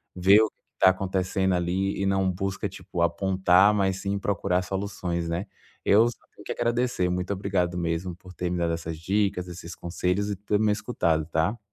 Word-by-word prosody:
vê 95 +4 +6
o 110 - +2
que - - -57
que - - -51
tá - - +10
acontecendo 95 0 0
ali 90 +3 0
e - - +1
não 95 -1 +2
busca, 95 +2 -3
tipo, 90 -2 -6
apontar, 95 +3 +4
mas 95 -2 +1
sim 100 0 -1
procurar 95 -2 0
soluções, 90 -3 -3
né. 85 +4 -2 0.4
Eu 110 +4 +6
só 120 - -9 0.2
tenho - - -13
que - - -4
agradecer, 120 -5 0
muito 90 +2 -2
obrigado 95 -3 -1
mesmo 85 +1 -2
por 90 +1 -14
ter 90 0 -3
me 90 - -1
dado 85 -1 0
essas 80 -1 -4
dicas, 95 +1 0
esses 85 -1 -8
conselhos 90 +3 -1
e 100 - -1
ter 105 +2 -1
me 110 -1 +3
escutado, 85 -8 0
tá? 85 +8 0
95 Hz, 195 wpm, -26 LUFS, 90-100 Hz, 0.4 s, tá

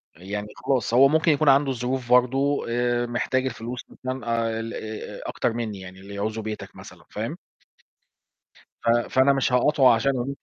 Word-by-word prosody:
يعني 100 +4 -5 0.2
خلاص 130 -3 0
هو 135 +3 +7
ممكن 160 +2 +3
يكون 145 0 +3
عنده 135 0 +4
ظروف 125 0 -3
برضه. 135 +3 +3
آآ، 120 0 0
محتاج 130 +2 -1
الفلوس 120 -1 -5
مثلًا 130 0 -6 0.2
آآ 115 0 -2
ال 115 0 -5
أ 110 0 -7
أكتر - - -1
مني 110 -4 -4
يعني 95 0 -11
اللي 100 +1 -10
يعوزه 110 +2 -3
بيتك 110 0 -7
مثلًا. - - -13
فاهم؟ - - -4 1.5
ف 115 - +1
فأنا 130 +4 +3
مش 135 -2 0
هاقاطعه 130 -1 +5
عشان 135 +2 -1
120 Hz, 160 wpm, -24 LUFS, 115-135 Hz, 1.5 s, هو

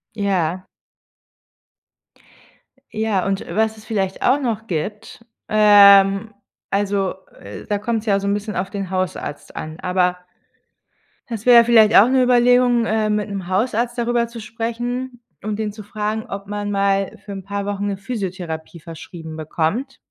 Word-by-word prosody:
Ja. 185 -3 -1 2.3
Ja, 215 -4 -1
und 195 0 -2
was 220 0 0
es 215 - -15
vielleicht 195 -4 -2
auch 265 +3 +3
noch 225 -4 -2
gibt, 210 +5 -5 0.2
ähm, 200 0 +6 0.4
also, 200 -1 0 0.3
äh, 100 +1 -10
da 205 - 0
kommt's 225 +1 -2
ja 200 -1 +3
so 200 - -4
'n 200 - +2
bisschen 210 +1 -4
auf 185 +1 -2
den 195 -3 -4
Hausarzt 185 -5 -4
an, 155 0 -7
aber 180 0 +1 1.1
es 225 -3 -6
wäre 240 -1 +8
vielleicht 225 -2 +5
auch 215 - +8
'ne 260 0 +3
Überlegung, 245 -1 +4
äh, 220 -1 0
mit 210 0 -1
'nem 195 -3 -5
Hausarzt 235 +5 0
darüber 235 0 0
zu 235 0 -10
sprechen 240 +3 -4 0.2
und 215 0 -3
ihn 215 -1 -2
zu 215 +1 -10
fragen, 215 +1 -3
ob 195 0 -6
man 205 0 -4
mal 195 -1 0
für 205 - -8
'n 195 -1 -6
paar 200 +1 -4
Wochen 205 0 -2
'ne 200 - -2
Physiotherapie 185 -6 -5
verschrieben 160 0 -10
bekommt. 170 - -2
205 Hz, 150 wpm, -20 LUFS, 195-225 Hz, 2.3 s, wäre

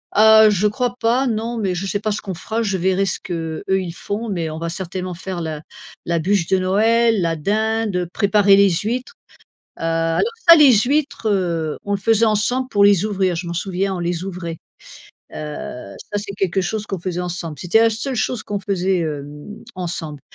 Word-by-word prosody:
Heu, 220 +1 +7
je 210 0 +2
crois 245 +3 -2
pas 240 +4 +2
non, 230 +1 -2
mais 195 -4 -1
je 180 +2 -3
sais 195 +1 -1
pas 215 0 -1
ce 205 - -3
qu'on 195 - -5
fera. 220 +6 -3
Je 200 -4 -1
verrai 190 +2 +1
ce 185 - -2
qu'eux, 165 -3 -5
ils 190 -3 0
font, 205 +6 -4
mais 170 -5 -2
on 155 - -6
va 165 +1 -4
certainement 185 +1 -5
faire 185 +1 -6
la 155 -2 -4 0.4
la 170 -1 0
bûche 185 0 +1
de 190 - +2
Noël, 220 +4 +2
la 165 -1 0
dinde, 215 +1 0
préparer 200 -1 +4
les 200 0 +5
huîtres. 225 +8 -2 0.7
Heu, - - -9
alors 165 0 +1 0.3
ça 335 - +11
les 295 -5 +7
huîtres, 285 -4 0
heu, 170 -6 0
on 205 - -3
le - - +1
faisait 225 +2 +3
ensemble 225 +4 +1
pour 205 -5 +3
les 200 -2 +5
ouvrir, 190 -4 0
je 170 +1 -4
m'en 170 - -4
souviens, 190 +2 -2
on - - -4
les 175 0 -2
ouvrait. 175 -3 -6 0.8
Heu, - - -7 0.8
ça 205 - 0
c'est 200 -1 -6
quelque 190 0 0
chose 210 +3 -3
qu'on 195 - -4
faisait 180 0 -3
ensemble. 175 -4 -5
C'était 180 +8 +2
la 230 - +4
seule 250 +5 -3
chose 240 0 -1
qu'on 205 -1 -3
faisait, 190 -1 0
hem, 150 +6 -6
ensemble. 165 -5 -5
195 Hz, 200 wpm, -20 LUFS, 175-220 Hz, 0.8 s, ça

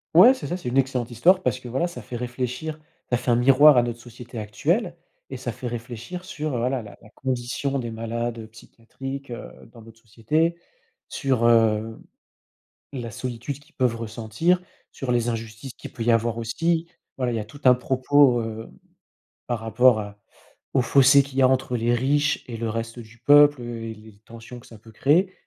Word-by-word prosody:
Ouais, 195 +10 +9
c'est 260 - -7
ça, 175 - -3
c'est 175 - -5
une 125 - -1
excellente 130 -2 -1
histoire 180 - +3
parce - - 0
que 125 - -10
voilà, 130 +8 -1
ça 175 - -9
fait 125 - -8
réfléchir, 125 +5 -4 0.3
ça 120 - +3
fait 125 - -4
un 120 - +5
miroir 135 +4 +6
à 120 - +5
notre 120 0 -4
société 120 0 -10
actuelle 165 - -1 0.3
et 130 - -6
ça 125 -1 -4
fait 125 +2 -7
réfléchir 120 +9 -7
sur, 155 -7 -4
heu, - - -1
voilà, 125 +1 -1
la 105 - -12
la - - -17
condition 130 +2 -2
des 120 -3 -4
malades, 115 +1 -4
heu, 110 - -8
psychiatriques, 135 +5 -9
heu, 120 - -7 0.2
dans 115 -2 -14
notre 115 0 -16
société, 150 +10 0 0.5
sur, 130 -4 +1
hem, 115 -1 +2 0.9
la 125 -4 -5
solitude 125 +4 -5
qu'ils 150 +3 -24
peuvent 125 -3 +1
ressentir, 115 - -1 0.3
sur 125 -2 -3
les 120 0 +1
injustices 115 +2 -6
qui - - -8
peut 115 - -6
y 120 - +3
avoir 115 0 +1
aussi. 165 +9 -1 0.3
Voilà, 125 -2 -1
il - - -2
y - - -1
a 105 - -5
tout 140 +7 -14
un 125 - +7
propos, 130 0 +3
hem, 110 0 -6 0.8
par 120 -2 -2
rapport 115 +1 +4
à 105 0 -8 0.5
au 135 - +3
fossé 135 +2 +6
qu'il 135 -1 -8
y - - +5
a 130 - +6
entre 130 -1 0
les 120 +1 +1
riches 145 +4 +1
et 115 - -5
le 115 0 -3
reste 115 +1 -5
du 115 0 -12
peuple, 145 +2 +6
heu, 120 -1 -6
et 115 0 -5
les 110 0 -15
l 100 -2 -18
tensions 115 +2 -11
que 120 - -16
ça 115 - -14
peut 110 +2 -16
créer. 160 - +2
120 Hz, 205 wpm, -24 LUFS, 115-135 Hz, 0.9 s, Ouais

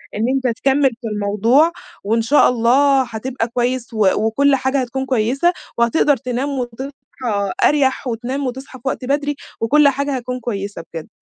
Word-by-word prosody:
إن 210 - -1
أنتَ 255 -3 -1
تكمل 275 0 +3
في 235 - -5
الموضوع، 215 +9 +2 0.3
وإن 225 +3 +1
شاء 275 +6 +4
الله 260 +3 +3
حتبقى 235 +1 -4
كويس 245 +1 -1
وكُلّ 220 +6 +2
حاجة 265 +1 0
هتكون 265 +2 -3
كويسة 265 +7 +1 0.2
وهتقدر 270 +4 +3
تنام 255 +3 -3
وتصحى 260 0 -4 0.7
أريح 275 -2 +2
وتنام 250 +4 -3
وتصحى 260 +1 -7
في 245 - -8
وقت 260 - -2
بدري، 290 +2 0 0.3
وكل 290 +6 +4
حاجة 280 0 0
هتكون 250 0 -4
كويسة 200 -6 -5
بجد. 165 -2 -6
255 Hz, 150 wpm, -19 LUFS, 230-275 Hz, 0.7 s, شاء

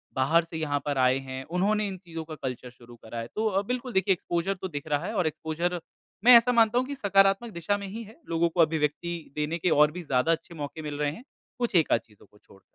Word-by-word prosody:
बाहर 150 +6 +3
से 165 0 -8
यहाँ 145 -2 -1
पर 145 -2 -1
आए 130 0 +4
हैं, 130 0 -6
उन्होंने 205 +5 +1
इन 190 -1 -5
चीज़ों 165 -3 -7
का 155 0 -7
कल्चर 125 -1 -4
शुरू 120 -1 -16
करा 115 0 -8
है। 115 - -5
तो 220 - 0
अ, 195 -1 +1
बिल्कुल 250 0 -3
देखिए, 190 0 +3
एक्सपोज़र 175 +1 -2
तो 190 - -2
दिख 145 -3 -6
रहा 145 +2 0
है - - -4
और 180 - +2
एक्सपोज़र 165 +3 -2 0.5
मैं 245 0 +10
ऐसा 235 +2 +3
मानता 230 -1 +4
हूँ 255 - -1
कि 285 - -4
सकारात्मक 195 0 +3
दिशा 170 +4 -1
में 200 -1 -6
ही 225 +4 -6
है, 220 +8 -15
लोगों 170 0 +2
को 170 +1 +2
अभिव्यक्ति 160 +1 -1
देने 150 +2 -1
के 175 +2 0
और 150 -1 +5
भी 180 +3 -6
ज़्यादा 140 0 +1
अच्छे 165 +1 -3
मौके 145 0 -6
मिल 150 -1 -5
रहे 145 -1 +1
हैं, 205 +11 -10 0.4
कुछ 240 -5 -1
एक-आध 160 -8 +4
चीज़ों 105 -3 -22
को 105 - -21
छोड़। 95 -2 -21
165 Hz, 250 wpm, -27 LUFS, 145-195 Hz, 0.5 s, मैं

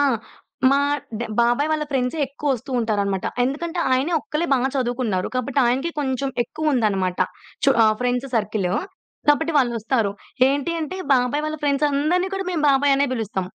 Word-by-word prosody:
ఆ! - - +4 0.7
మా 275 - +4 0.4
డ్ - - -3 0.2
బాబాయి 240 +6 +2
వాళ్ళ 305 -1 0
ఫ్రెండ్సే 265 +2 -1
ఎక్కువ 285 +2 -5
వస్తూ 255 +2 -9
ఉంటారనమాట. 200 -4 -1 0.2
ఎందుకంటే, 330 +6 -3
ఆయనే 270 +7 +1
ఒక్కళ్ళే 320 +3 -2
బా 270 - +4 0.2
చదువుకున్నారు. 245 -7 -1
కాబట్టి 255 +2 -1
ఆయనకే 265 +7 0
కొంచెం 270 -1 -1
ఎక్కువుందనమాట. 220 - 0 0.5
చు 275 - +6
ఆహ్, 215 0 +4
ఫ్రెండ్స్ 250 +2 0
సర్కిల్‌. 205 -4 -1 0.6
కాబట్టి 320 +3 +3
వాళ్ళొస్తారు. 230 -3 +1 0.4
ఏంటి 285 +4 0
అంటే 320 +4 -4 0.2
బాబాయి 260 +4 +1
వాళ్ళ 310 0 -3
ఫ్రెండ్సందరిని 295 +5 +1
కూడా 385 0 -3
మేము 320 -3 -1
బాబాయి 275 +1 +4
అనే 280 +1 +2
బిలుస్తం. 200 -6 -2
265 Hz, 150 wpm, -22 LUFS, 235-295 Hz, 0.7 s, చు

